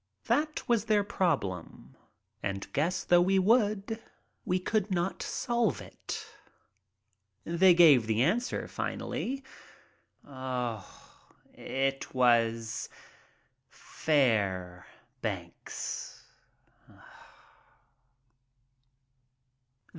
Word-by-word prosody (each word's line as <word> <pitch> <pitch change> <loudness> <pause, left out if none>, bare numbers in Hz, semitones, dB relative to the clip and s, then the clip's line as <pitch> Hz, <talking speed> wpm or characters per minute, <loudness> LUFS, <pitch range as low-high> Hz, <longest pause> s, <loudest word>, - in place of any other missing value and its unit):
That 305 0 0
was 235 -3 +2
their 210 -2 +3
problem, 145 - -2 0.5
and, 100 0 -3
guess 170 +6 0
though 175 0 +5
we 190 +2 +3
would, 215 +1 +2 0.4
we 185 -4 +1
could 210 +2 -1
not 185 0 -1
solve 240 -1 0
it. - - -7 1.2
They 175 +1 +5
gave 145 -10 +7
the 110 +2 +2
answer 225 - 0
finally. 270 +2 -4 2.1
It 135 0 -3
was 115 -2 +2 0.8
"Fairbanks." 100 - -3
175 Hz, 65 wpm, -30 LUFS, -, 2.1 s, gave